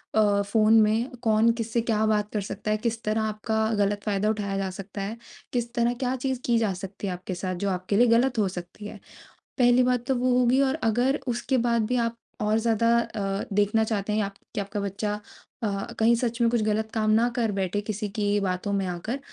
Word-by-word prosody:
अ, 205 -2 +4
phone 215 +2 +3
में 220 +4 +2
कौन 220 0 +4
किससे 230 +1 0
क्या 220 -2 +1
बात 210 -1 +1
कर 210 - 0
सकता 200 +2 -4
है। 215 - +2
किस 230 +1 -2
तरह 215 +1 0
आपका 220 0 -2 0.2
गलत 205 0 0
फ़ायदा 210 0 0
उठाया 200 -2 -2
जा 195 -1 -1
सकता 195 +2 -7
है। 210 +4 -4 0.4
किस 240 -1 -2
तरह 235 0 +1
क्या 255 +1 -2
चीज़ 260 0 -2
की 235 -1 +3
जा 215 -4 +1
सकती 195 +2 -6
है 185 - -2
आपके 180 +1 -6
साथ 185 0 -3
जो 200 - +1
आपके 185 +2 -1
लिए 245 +1 +5
गलत 240 +2 +3
हो 205 - +3
सकती 180 +4 -8
है। 210 - -9 0.6
पहली 245 0 +5
बात 250 -1 +1
तो 265 - +2
वो 250 +1 +1
होगी 250 +2 +4
और 270 0 +2
अगर 245 +5 +2
उसके 250 +2 0
बाद 230 -2 +2
भी 250 - 0
आप 230 0 -1 0.2
और 210 +1 +2
ज़्यादा 230 +1 +2
अ, 195 -4 -2
देखना 210 +2 +2
चाहते 210 -1 -1
हैं 215 0 +1
आप 200 0 -5 0.2
कि 205 - 0
आपका 205 +1 -4
बच्चा 205 +1 -3 0.4
अ, 215 - +1 0.3
कहीं 225 +2 +5
सच 235 0 -2
में 230 - +4
कुछ 235 -2 +1
गलत 215 +1 0
काम 215 -1 +1
ना 230 +2 +4
कर 230 -3 +1
बैठे 195 +1 -1
किसी 210 0 -3
की 205 0 0
बातों 185 +1 -2
में 195 -1 0
आकर। 200 +10 -4
215 Hz, 225 wpm, -26 LUFS, 200-235 Hz, 0.6 s, लिए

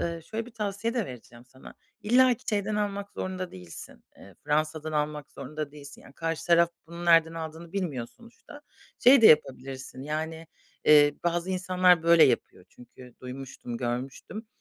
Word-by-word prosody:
eee, 170 -1 -3
şöyle 220 +6 -5
bir - - -12
tavsiye 215 0 -3
de 235 -6 -1
vereceğim 120 -1 -12
sana. 130 +1 -15 0.3
İllaki 245 +2 +4
şeyden 210 0 -1
almak 200 -1 -3
zorunda 185 -1 -5
değilsin. 90 -8 -12
Eee, 100 - -15
Fransa’dan 155 +1 -1
almak 150 -1 -2
zorunda 150 +2 -6
değilsin. 145 -1 -12
Yani - - -16
karşı 165 +1 -4
taraf 170 0 +4 0.2
bunu 170 +1 -8
nereden 165 -1 +4
aldığını 165 +1 -8
bilmiyor 150 -12 -3
sonuçta. 240 +5 -15 0.4
Şey 260 +2 +7
de - - +10
yapabilirsin, 135 -4 +1
yani, 160 +2 -4 0.4
eee, 145 -1 +6
bazı 175 +1 -1
insanlar 180 -2 +3
böyle 170 -1 +6
yapıyor 120 -7 -1
çünkü 125 0 -16
duymuştum, 125 -2 -8
görmüştüm. 130 - -5
160 Hz, 150 wpm, -27 LUFS, 135-190 Hz, 0.4 s, de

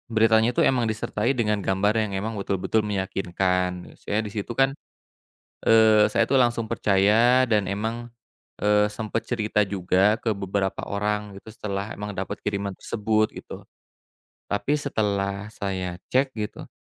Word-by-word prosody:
beritanya 110 +1 +4
itu - - -3
emang 125 -2 +3
disertai 110 +2 -1
dengan 105 -6 0
gambar 100 +3 +1
yang 105 - -4
emang 110 +2 -4
betul-betul 100 +2 0
meyakinkan, 90 -2 -2
misalnya 105 +1 -2
di - - -8
situ 105 +2 -3
kan, 135 +1 +3 0.9
eee, 110 -1 +6
saya, 115 -1 +2
tuh, 135 - +4
langsung 120 -3 +1
percaya 115 +4 +3
dan 105 -2 +2
emang, 115 +5 -4 0.5
eee, 105 0 +4
sempet 110 +1 -3
cerita 105 -3 0
juga 95 +3 +1
ke 110 -4 -1
beberapa 95 0 -2
orang, 105 0 -2
gitu, 110 - -13
setelah 105 -2 -4
emang 105 0 -5
dapat 95 0 -4
kiriman 100 -2 -2
tersebut, 110 0 0
gitu. - - -10 0.9
Tapi 105 +8 +1
setelah 100 -7 -2
saya 95 -3 -3 0.2
cek, 130 0 +1
gitu, 105 -1 -5
105 Hz, 145 wpm, -24 LUFS, 100-115 Hz, 0.9 s, eee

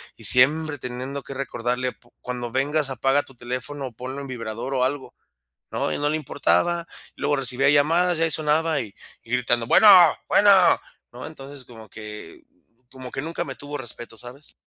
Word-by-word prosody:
Y - - -5
siempre 145 +4 +4
teniendo 130 +3 -6
que 140 - -8
recordarle: 125 -1 -2
“Pu 120 - -26
cuando 120 -1 -5
vengas 145 +2 0
apaga 135 +3 +1
tu 135 - -17
teléfono, 125 +3 -5
o - - -9
ponlo 130 +4 -7
en 140 - -7
vibrador 115 +1 -5
o 125 -1 +1
algo”. 135 +1 -3 0.6
No, - - -2
a - - -2
él - - -4
no 145 - +1
le 155 - 0
importaba, 170 +3 0 0.3
luego 145 - 0
recibía 135 +1 +2
llamadas, 165 +4 +3
y - - +1
ahí 165 - +2
sonaba, 155 +1 +1
y 105 -3 -7 0.3
y 115 - -18
gritando: 120 -1 +1
“Bueno, 215 - +6 0.4
bueno”. 205 0 +5 0.6
No, 125 - -8
entonces, 140 -3 -10
como 110 -3 -13
que 105 -6 -10 0.5
como 130 -1 -9
que 135 - -4
nunca 165 +2 -4
me 135 - -6
tuvo 145 +4 -7
respeto, 120 -2 -10
¿sabes? 125 +4 -12
135 Hz, 185 wpm, -23 LUFS, 125-145 Hz, 0.6 s, Bueno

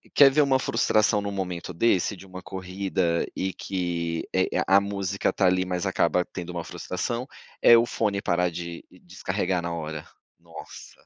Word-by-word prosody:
quer 140 -1 +9
ver 150 - +4
uma 135 -2 +3
frustração 110 -3 +2
num 100 0 -3
momento 90 -2 -4
desse, 100 0 +2
de 95 - -13
uma 95 -1 -9
corrida, 95 -2 -2
e 95 -1 -2
que, 85 -3 -3
eh, 95 0 +2 0.2
a 95 - +6
a 100 - +4
música 100 -1 -1
tá 95 - +1
ali, 90 0 +3
mas 90 -1 -2
acaba 90 -1 +1
tendo 90 -2 -7
uma 85 -1 -4
frustração? 115 +11 -4 0.3
É 120 - +8
o 115 - +4
fone 105 -4 -1
parar 90 0 +1
de 85 0 -6 0.2
descarregar 95 0 -2
na 85 0 -4
hora. 80 -2 -5 0.3
Nossa! 85 -1 -12
95 Hz, 175 wpm, -26 LUFS, 85-100 Hz, 0.3 s, quer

